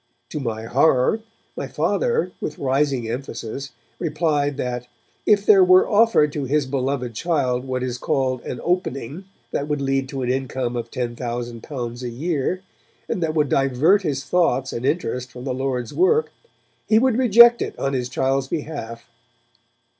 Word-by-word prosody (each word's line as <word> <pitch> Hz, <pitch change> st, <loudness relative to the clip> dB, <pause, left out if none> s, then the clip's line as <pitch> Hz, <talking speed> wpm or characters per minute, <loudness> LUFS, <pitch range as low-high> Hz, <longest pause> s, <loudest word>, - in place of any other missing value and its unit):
To -, -, -4 dB
my 115 Hz, -4 st, -3 dB
horror, 130 Hz, -, +3 dB, 0.4 s
my -, -, -4 dB
Father, 475 Hz, -1 st, 0 dB
with -, -, -4 dB
rising 135 Hz, -3 st, 0 dB
emphasis, 125 Hz, +2 st, -5 dB, 0.3 s
replied 150 Hz, -3 st, 0 dB
that 125 Hz, -1 st, -3 dB, 0.4 s
'if 205 Hz, -1 st, +4 dB
there 195 Hz, -3 st, +7 dB
were 185 Hz, 0 st, +6 dB
offered 205 Hz, -9 st, +4 dB
to 145 Hz, -2 st, -2 dB
his 145 Hz, +2 st, +1 dB
beloved 130 Hz, -2 st, -2 dB
child 130 Hz, -3 st, 0 dB
what 130 Hz, -1 st, -2 dB
is 125 Hz, -1 st, -3 dB
called 130 Hz, -4 st, 0 dB
"an 125 Hz, -, -5 dB
opening" 175 Hz, -2 st, -2 dB, 0.3 s
that 145 Hz, -, -2 dB
would 150 Hz, -1 st, -1 dB
lead 135 Hz, -1 st, -1 dB
to 135 Hz, -1 st, -4 dB
an 125 Hz, -, -1 dB
income 130 Hz, -2 st, -2 dB
of 120 Hz, -1 st, -4 dB
L10,000 120 Hz, +1 st, -5 dB
a 125 Hz, -, -4 dB
year, 160 Hz, +7 st, -2 dB, 0.4 s
and 180 Hz, -, -2 dB
that 160 Hz, -1 st, -1 dB
would 150 Hz, -3 st, +2 dB
divert 135 Hz, -, +3 dB
his 140 Hz, -6 st, -2 dB
thoughts 140 Hz, -4 st, +1 dB
and 120 Hz, +3 st, -2 dB
interest 130 Hz, -5 st, -1 dB
from 125 Hz, 0 st, -9 dB
the 130 Hz, -1 st, -2 dB
Lord's 130 Hz, -2 st, -3 dB
work 450 Hz, +6 st, +2 dB, 0.6 s
he 215 Hz, -, +5 dB
would 250 Hz, 0 st, +3 dB
reject 235 Hz, 0 st, +7 dB
it -, -, -4 dB
on 135 Hz, -, -1 dB
his 125 Hz, -2 st, -2 dB
child's 135 Hz, +1 st, 0 dB
behalf.' 135 Hz, -7 st, -5 dB
135 Hz, 160 wpm, -22 LUFS, 125-160 Hz, 0.6 s, there